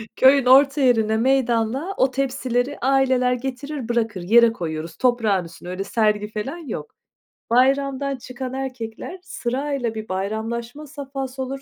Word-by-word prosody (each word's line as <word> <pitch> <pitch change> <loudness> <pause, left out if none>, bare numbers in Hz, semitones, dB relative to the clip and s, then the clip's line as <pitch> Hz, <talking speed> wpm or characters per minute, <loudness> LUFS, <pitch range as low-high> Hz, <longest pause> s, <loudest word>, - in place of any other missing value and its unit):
Köyün 265 0 +5
orta 275 +2 +6
yerinde, 220 -4 +3
meydanda 255 - +1
o 260 - +3
tepsileri 260 0 -1
aileler 260 -1 +2
getirir, 265 +1 -5
bırakır. 225 -5 -1
Yere 230 +5 +5
koyuyoruz, 160 -3 -5
toprağın 225 -8 +2
üstüne, 165 +1 -11
öyle 185 +2 -3
sergi 210 -1 +1
falan 265 +10 -4
yok. 235 - -7 0.6
Bayramdan 275 +2 +2
çıkan 255 +1 -7
erkekler 260 +5 -6
sırayla, 255 - -3
bir 220 -2 -6
bayramlaşma 230 +8 -4
safhası 270 -2 -6
olur, 270 +1 -5
250 Hz, 130 wpm, -22 LUFS, 225-270 Hz, 0.6 s, orta